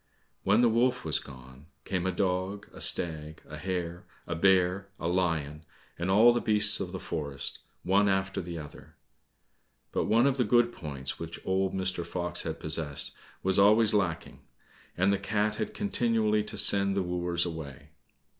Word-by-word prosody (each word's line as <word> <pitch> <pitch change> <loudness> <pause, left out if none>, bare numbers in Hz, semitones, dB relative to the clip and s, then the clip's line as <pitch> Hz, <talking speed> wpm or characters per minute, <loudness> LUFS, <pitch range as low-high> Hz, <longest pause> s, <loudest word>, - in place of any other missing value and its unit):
When 105 +4 +4
the 120 - +5
wolf 120 +3 +1
was - - +1
gone, 65 +2 -14 0.2
came 95 -1 -2
a - - +1
dog, 95 +2 -2
a - - -11
stag, 80 -2 +1
a 75 - -8
hare, 85 +1 -4 0.2
a 85 - -3
bear, 95 +2 +2
a 85 - -2
lion, 80 -4 -1 0.4
and 85 +2 -2
all 110 +5 +6
the 120 - 0
beasts 105 -1 +2
of 90 -2 -4
the 95 - -5
forest, 70 -5 -5 0.2
one 100 +2 +3
after 95 0 -1
the 85 -1 -7
other. 75 -2 -11 1.0
But - - -1
one 115 +4 +3
of 140 -1 +2
the 125 - +3
good 120 +2 +3
points 70 - -6
which 85 0 -7
old 95 0 0
Mr. 95 -2 -1
Fox 90 0 -4
had 80 - -5
possessed, 75 -2 -1 0.3
was 95 +1 +2
always 105 +2 +5
lacking, 95 -6 -1 0.6
and 95 +3 +3
the 100 - 0
cat 105 +1 -1
had 215 0 -4
continually 115 - +1
to 105 0 -5
send 100 0 +4
the 95 - +1
wooers 90 -1 0
away. 80 -6 -7
95 Hz, 170 wpm, -29 LUFS, 85-105 Hz, 1.0 s, all